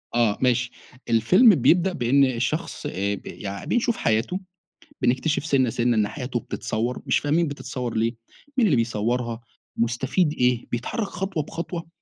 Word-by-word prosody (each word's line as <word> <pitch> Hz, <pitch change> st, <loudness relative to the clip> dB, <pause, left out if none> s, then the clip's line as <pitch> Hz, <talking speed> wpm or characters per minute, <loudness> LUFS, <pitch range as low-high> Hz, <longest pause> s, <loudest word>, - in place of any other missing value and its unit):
آه، 115 Hz, -4 st, +3 dB
ماشي، 125 Hz, -1 st, +2 dB, 0.4 s
الفيلم 180 Hz, -, +6 dB
بيبدأ 175 Hz, +7 st, +3 dB
بإن 135 Hz, +1 st, +3 dB
الشخص 130 Hz, +8 st, -2 dB
ب 100 Hz, +1 st, -2 dB
يعني 100 Hz, -1 st, -6 dB
بيشوف 240 Hz, -1 st, +1 dB
حياته، 115 Hz, -, 0 dB, 0.6 s
بنكتشف 135 Hz, +5 st, +1 dB
سِنّة، 130 Hz, -5 st, +2 dB
سِنّة 120 Hz, 0 st, +1 dB
إن 105 Hz, -1 st, +3 dB
حياته 125 Hz, 0 st, -4 dB
بتتصوّر، 120 Hz, +3 st, -3 dB
مش -, -, +2 dB
فاهمين 155 Hz, +3 st, +1 dB
بتتصوّر 125 Hz, -4 st, -5 dB
ليه، 115 Hz, +2 st, 0 dB, 0.4 s
مين 230 Hz, -4 st, +4 dB
اللي 155 Hz, -, +3 dB
بيصوّرها؟ 115 Hz, +1 st, -1 dB, 0.4 s
مُستفيد 130 Hz, +8 st, +1 dB
إيه؟ 125 Hz, -1 st, +1 dB
بيتحرك 160 Hz, -, -2 dB
خطوة 190 Hz, -5 st, -3 dB
بخطوة. 170 Hz, +1 st, -6 dB
125 Hz, 140 wpm, -24 LUFS, 115-160 Hz, 0.6 s, الفيلم